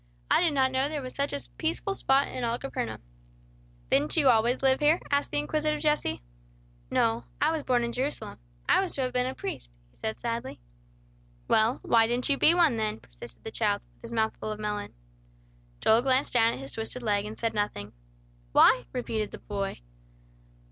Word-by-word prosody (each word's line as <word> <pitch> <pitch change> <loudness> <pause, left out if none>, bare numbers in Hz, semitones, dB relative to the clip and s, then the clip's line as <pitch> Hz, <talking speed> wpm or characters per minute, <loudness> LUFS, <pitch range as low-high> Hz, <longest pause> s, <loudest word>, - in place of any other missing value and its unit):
I - - +5
did 335 -4 +2
not 260 -1 +3
know 260 +2 +1
there 300 -3 -4
was 255 - -6
such 280 +1 -1
a 285 - -2 0.2
peaceful 330 +4 -1
spot 275 -6 +2
in 255 - -5
all 235 0 0
Capernaum." 115 - -5 0.9
"Didn't 145 - +2
you 285 -4 +5
always 240 +2 +3
live 265 0 +4
here?" 305 +3 +4
asked 285 0 +1
the 145 - -2
inquisitive 300 - 0
Jesse. 300 - 0 0.7
"No, 115 +1 +1
I - - +3
was 320 -2 -1
born 245 -3 +1
in 235 - -2
Jerusalem. 265 +5 -3 0.3
I - - +5
was 380 - -3
to 275 - -1
have 255 -1 -2
been 250 0 +1
a 260 - -4
priest," - - -7
he - - -31
said 220 0 -4
sadly. 235 - -4 0.9
"Well, 220 +3 +2
why 225 -1 +4
didn't 245 +3 0
you 280 - +3
be 330 - +6
one 325 -9 +4
then," 215 -1 -1
persisted - - -12
the - - -6
child, - - 0
with - - -32
his - - -9
mouth 220 -1 0
full 215 - -4
of 215 - -6
melon. 210 - -4 0.9
Joel 225 +2 +5
glanced 260 +1 +1
down 230 -2 +4
at - - -6
his 135 +1 -7
twisted 225 +2 -4
leg, 205 -2 +1
and 215 +1 -7
said 230 -1 -1
nothing. 205 - -3 0.6
"Why?" 125 - +6
repeated 225 -4 -2
the - - -9
boy. 200 - -4
240 Hz, 195 wpm, -28 LUFS, 210-275 Hz, 0.9 s, be